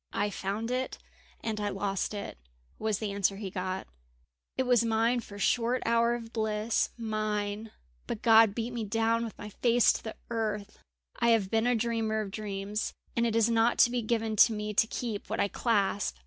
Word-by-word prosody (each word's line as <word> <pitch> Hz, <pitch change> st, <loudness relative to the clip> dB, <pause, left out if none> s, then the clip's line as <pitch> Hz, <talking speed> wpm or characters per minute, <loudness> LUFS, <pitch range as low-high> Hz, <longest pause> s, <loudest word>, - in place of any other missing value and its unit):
"I 205 Hz, 0 st, 0 dB
found 205 Hz, +5 st, -3 dB
it 255 Hz, +1 st, -2 dB, 0.4 s
and 220 Hz, -2 st, -3 dB
I 205 Hz, -, 0 dB
lost 195 Hz, +1 st, -2 dB
it," 200 Hz, -, -6 dB, 0.4 s
was 215 Hz, -2 st, 0 dB
the 210 Hz, -1 st, -3 dB
answer 200 Hz, 0 st, +1 dB
he 195 Hz, -2 st, -5 dB
got. 185 Hz, +1 st, -3 dB, 0.7 s
"It 260 Hz, -, +2 dB
was 245 Hz, -2 st, +4 dB
mine 230 Hz, +2 st, +2 dB
for 210 Hz, -3 st, -10 dB
a -, -, -9 dB
short 240 Hz, +4 st, +1 dB
hour 235 Hz, +1 st, +3 dB
of 230 Hz, -1 st, -8 dB
bliss 220 Hz, 0 st, 0 dB
mine; 215 Hz, -1 st, -2 dB, 0.4 s
but -, -, -1 dB
again -, -, -26 dB
God 225 Hz, -2 st, +6 dB
beat 235 Hz, +1 st, -3 dB
me 235 Hz, -2 st, -2 dB
down 225 Hz, +2 st, +1 dB
with 225 Hz, -, -6 dB
my 210 Hz, -, -7 dB
face 240 Hz, +3 st, +3 dB
to -, -, -6 dB
the 220 Hz, -, -6 dB, 0.2 s
earth. 210 Hz, -3 st, -3 dB, 0.4 s
"I 235 Hz, -, +3 dB
have 220 Hz, -5 st, +3 dB
been 225 Hz, +1 st, +2 dB
a 245 Hz, -, +3 dB
dreamer 225 Hz, -1 st, 0 dB
of 200 Hz, -2 st, -5 dB
dreams, 205 Hz, 0 st, -3 dB, 0.2 s
and 235 Hz, 0 st, +2 dB
it 225 Hz, -, -1 dB
is 230 Hz, -1 st, +4 dB
not 230 Hz, 0 st, +3 dB
to 240 Hz, -, +6 dB
be 245 Hz, -1 st, 0 dB
given 225 Hz, -1 st, -1 dB
to 225 Hz, -, +7 dB
me 210 Hz, 0 st, -3 dB
to 220 Hz, +2 st, +3 dB
keep 225 Hz, -3 st, -4 dB
what -, -, -2 dB
I 200 Hz, -, +3 dB
clasp. 205 Hz, -, 0 dB
220 Hz, 205 wpm, -29 LUFS, 205-230 Hz, 0.7 s, to